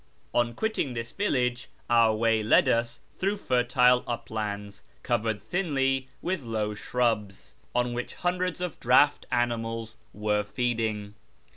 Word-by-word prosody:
On 120 -1 +1
qiiittinji: 220 - -1
tliis 115 0 -5
villa<4e 125 -9 0 0.2
our 115 -2 +5
way 115 0 +2
led 105 - +4
us 115 0 0 0.2
tlirou^di 200 +2 0
fertile 125 -5 +3
uplands 105 -3 -4 0.2
covered 110 -3 0
thinly 135 -7 0 0.2
with 180 -3 -1
low 110 -3 -2
shrubs, 105 -3 -1 0.2
on 125 0 +1
which 125 +1 -4
hundreds 180 0 -1
of 180 -4 -4
draught 135 +4 +4
camels 115 -2 -1
were 105 +1 0
feeding. 110 -3 -2
120 Hz, 125 wpm, -27 LUFS, 110-130 Hz, 0.2 s, our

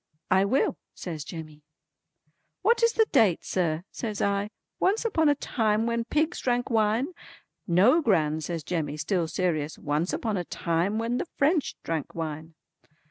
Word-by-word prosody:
"I 190 +1 +5
will" 255 +7 +1 0.2
says 160 -5 -5
Jemmy. 155 -2 -9 1.0
"What 465 +5 +4
is 465 0 +4
the 445 - +4
date 195 -7 +3
sir?" 170 -3 0
says 215 -4 -4
I. 200 +1 0 0.3
"Once 420 +5 +2
upon 320 -9 +3
a 290 - +4
time 220 -5 0
when 235 0 -1
pigs 310 +6 0
drank 245 0 0
wine?" 225 +5 +2 0.6
"No 205 - +5
Gran," 160 - +2
says 165 0 -4
Jemmy, 150 -3 -2
still 165 +2 0
serious; 160 -4 -1
"once 150 +4 -1
upon 220 -4 -1
a 180 - -1
time 170 +5 -1
when 230 +2 -1
the - - -3
French 300 +1 +2
drank 160 -4 -3
wine." 160 0 -5
200 Hz, 155 wpm, -27 LUFS, 160-245 Hz, 1.0 s, I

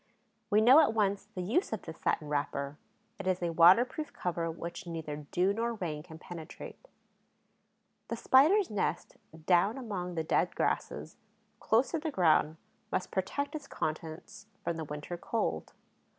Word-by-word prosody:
We 210 +1 +4
know 255 +7 +8
at 285 -8 +3
once 200 -2 +1
the 185 - -3
use 310 - 0
of - - -3
this - - -9
satin 150 - 0
wrapper; 145 0 -2 0.4
it 195 - -5
is 185 -1 0
a 170 - 0
waterproof 235 - +5
cover 170 -2 -2
which 170 +4 -7
neither 150 -3 -6
dew 185 +3 +2
nor 230 +2 -1
rain 160 -7 -4
can 160 0 -12
penetrate. 170 - -10 1.2
The - - -3
Spider's 320 - +5
nest, 190 -5 -2 0.3
down 190 +7 +3
among 190 -8 -4
the 160 - -1
dead - - +1
grasses, - - -2 0.4
close 230 +4 +2
to 330 - -1
the 315 +1 -3
ground, 160 - +3 0.3
must - - -2
protect 240 +10 -2
its 295 -3 -6
contents 160 - -5 0.2
from 170 - -1
the 160 - -4
winter 150 +4 -6
cold. 225 +6 -2
180 Hz, 155 wpm, -31 LUFS, 160-230 Hz, 1.2 s, know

